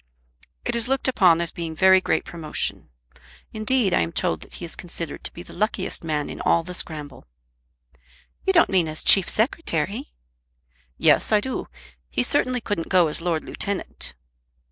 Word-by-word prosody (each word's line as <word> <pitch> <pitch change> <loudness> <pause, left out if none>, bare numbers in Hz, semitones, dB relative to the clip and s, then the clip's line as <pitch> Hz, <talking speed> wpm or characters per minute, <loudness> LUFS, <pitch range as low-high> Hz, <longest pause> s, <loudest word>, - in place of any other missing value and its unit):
"It - - -1
is 235 0 0
looked 270 0 +1
upon 180 -9 +4
as 170 - +2
being 165 -2 -5
very 190 +2 +6
great 160 - 0
promotion. 165 -3 -3 0.6
Indeed 215 -2 +1
I - - +4
am 85 0 -1
told 80 -2 0
that - - -12
he 175 - -6
is 165 - -5
considered 170 -3 -6
to - - -5
be 175 - -10
the - - -12
luckiest 210 -4 -2
man 150 -2 -1
in - - -7
all 170 - +3
the 180 +2 -7
scramble." 150 - -4 1.2
"You 385 - +3
don't 340 -3 +4
mean 180 -4 +3
as 155 0 -4
Chief 195 -3 +6
Secretary?" 205 - -1 0.9
"Yes, - - +4
I 210 - +5
do. 255 +4 -4 0.4
He 120 - 0
certainly 250 - +1
couldn't 205 -7 -3
go 180 -4 +4
as 150 - -3
Lord 165 -2 -1
Lieutenant." 200 - -5
175 Hz, 170 wpm, -24 LUFS, 160-215 Hz, 1.2 s, very